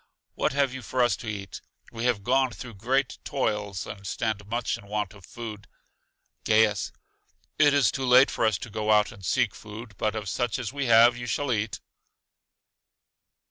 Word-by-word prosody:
What - - 0
have 140 -2 +1
you 130 - -6
for 125 +1 0
us 120 -4 +3
to 115 - -9
eat? 100 -2 -6 0.3
We 115 +1 -4
have 120 -5 +1
gone 130 +3 +3
through 120 0 -9
great 125 +6 -1
toils, 105 -8 -2
and 100 -2 -8
stand 105 0 -2
much 120 +2 -1
in 100 - -12
want 105 -2 -2
of 100 -4 -15
food. 110 -3 -8 0.8
Gaius: 110 -2 +3 0.7
It 145 -1 +6
is 140 - +4
too 135 -1 -3
late 125 +2 +7
for - - -2
us 110 -4 +1
to 115 - -8
go 110 0 0
out 105 -1 +4
and 100 - -14
seek - - +1
food; 110 +1 -10
but 110 0 0
of 110 -2 -4
such 120 +7 -1
as 120 -1 -4
we 140 -2 -2
have 115 +1 +7
you 120 0 -6
shall 140 +4 -1
eat. 105 0 -2
110 Hz, 185 wpm, -26 LUFS, 105-125 Hz, 0.8 s, late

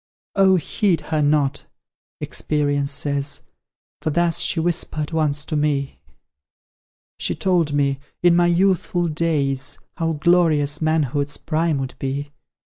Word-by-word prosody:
"Oh, 190 -1 +5
heed 185 +1 +1
her 155 -1 -1
not!" 145 -1 +1 0.5
Experience 145 -1 -1
says; 140 0 -1 0.6
"For - - -1
thus 170 +2 +1
she 165 - +2
whispered 160 -2 -1
once 150 -3 0
to 155 - -3
me; 145 -2 -1 1.2
She - - -1
told 175 -5 +1
me, 140 -1 +1 0.2
in 175 -1 +5
my 175 0 +4
youthful 175 0 +2
days, 150 -4 -1 0.2
How 165 -1 0
glorious 155 -3 +2
manhood's 145 -2 0
prime 160 -1 0
would 135 -1 -4
be. 140 +2 -3
155 Hz, 120 wpm, -21 LUFS, 145-170 Hz, 1.2 s, Oh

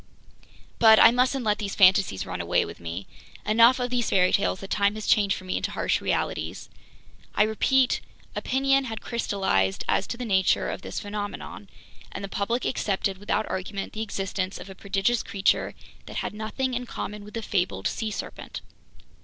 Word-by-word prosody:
But 220 -1 +8
I 230 - +9
mustn't 255 +2 +1
let 210 -1 +1
these 200 -2 -3
fantasies 190 - +4
run - - -4
away - - +1
with - - -9
me! 85 +3 -6 0.4
Enough 230 +4 +5
of 245 0 -2
these 245 -2 0
fairy 185 -1 +3
tales 195 -1 +1
that 195 - -9
time 200 0 +2
has 215 - -6
changed 200 -2 +3
for - - -9
me 185 - -1
into - - -2
harsh - - 0
realities. - - -2 0.6
I 210 - +5
repeat: 250 +4 +2 0.3
opinion 270 +1 +2
had 225 -3 -5
crystallized 190 - 0
as 195 - +1
to 235 - -4
the 250 - -4
nature 190 -4 +2
of - - -6
this - - -5
phenomenon, 205 -1 -6 0.4
and - - -6
the - - -3
public 230 +5 -1
accepted 195 -5 -1
without 210 +1 -1
argument 195 +1 -4
the 215 - -4
existence 195 -3 -3
of 195 - -9
a - - -8
prodigious 200 +5 0
creature 195 -1 0 0.3
that - - -9
had - - -3
nothing 220 +5 -3
in 250 0 -3
common 210 -2 -6
with 210 +2 -11
the 225 - -3
fabled 190 -3 -1
sea 220 - -2
serpent. 210 - -6
210 Hz, 180 wpm, -26 LUFS, 195-235 Hz, 0.6 s, I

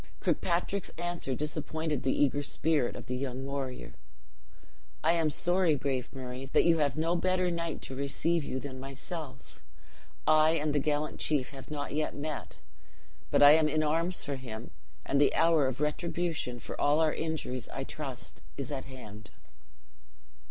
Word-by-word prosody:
Kirkpatrick's 180 +2 0
answer 175 -6 -2
disappointed 155 +1 -2
the 130 - +1
eager 145 0 +2
spirit 145 -2 +1
of - - -7
the 125 - -3
young 130 0 -3
warrior: 135 -2 -4 1.1
"I 160 - +5
am 165 -2 +2
sorry, 175 +1 +3
brave 130 -2 -2
Murray, 130 0 -6
that - - +6
you 165 -1 +4
have 145 -1 +1
no 165 +2 +1
better 185 0 +2
knight 170 -1 -3
to 130 - -5
receive 150 +4 0
you 130 - -3
than 130 -1 -7
myself. 130 - -8 0.6
I 155 +1 +6
and 150 -2 0
the 145 - +3
gallant 150 +1 -1
chief 145 -4 +1
have 135 -2 -10
not 145 -2 -4
yet 155 +1 -1
met; 150 0 -5 0.7
but - - +5
I 145 - +11
am 155 0 +5
in 155 +1 +1
arms 165 +4 +1
for 140 -2 -2
him; 120 -3 -7 0.3
and 140 +1 +2
the 145 - +4
hour 165 -4 +4
of 130 0 -3
retribution 155 -3 -1
for - - -6
all 145 +2 +4
our 160 -1 +3
injuries, 155 -6 -3
I 135 - -4
trust, 135 -3 -6 0.2
is 140 -1 -4
at 135 -2 -3
hand." 110 -5 -10
145 Hz, 165 wpm, -31 LUFS, 135-160 Hz, 1.1 s, I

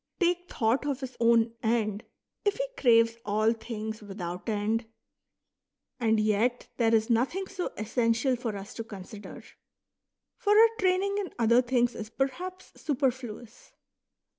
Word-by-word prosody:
take 355 0 +1
thought 230 +3 +1
of 275 -2 -2
his 260 -1 -6
own 230 -1 +4
end, 220 -2 0 0.4
if 410 -1 +2
he - - -1
craves 230 -2 +4
all 215 +2 +2
things 220 -1 -6
without 185 -1 -6
end? 220 +2 0 1.1
And 220 -2 +2
yet 215 +4 +1
there 230 -1 +3
is 220 +2 +1
nothing 265 +12 +1
so 375 -2 -4
essential 230 +3 +1
for 230 -3 -4
us 195 0 -9
to 225 - -5
consider. 205 -1 -10 0.9
For 415 0 +3
our 455 0 +8
training 385 +2 +2
in 390 -4 -4
other 235 +1 +5
things 245 -1 +1
is 215 0 -7
perhaps 355 +10 -4
superfluous. 245 -5 -3
230 Hz, 140 wpm, -28 LUFS, 220-270 Hz, 1.1 s, our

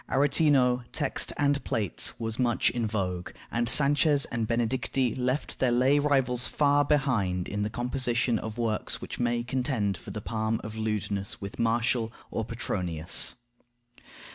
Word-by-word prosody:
Aretino, 135 -3 +3
text 145 -4 -1
and 145 -1 +1
plates, 105 -5 +1
was 115 +1 -3
much 120 -2 +2
in 120 -2 -1
vogue; 90 -4 -3 0.2
and 120 0 0
Sanchez 145 0 +4
and 115 -2 -1
Benedicti 120 +1 0
left 130 +3 -2
their 130 -2 +2
lay 130 +4 +3
rivals 135 -4 +2
far 145 -1 +3
behind 120 - 0
in 105 +1 -3
the 105 - -1
composition 120 0 0
of 110 +1 -6
works 110 - -1
which - - -7
may 120 -1 0
contend 125 -5 -1
for - - -11
the 105 +2 -5
palm 110 +1 -2
of 110 0 -7
lewdness 105 -2 -3
with 100 0 -8
Martial 115 0 +1 0.2
or 115 - -2
Petronius. 90 -7 -1
120 Hz, 145 wpm, -28 LUFS, 110-130 Hz, 0.2 s, Sanchez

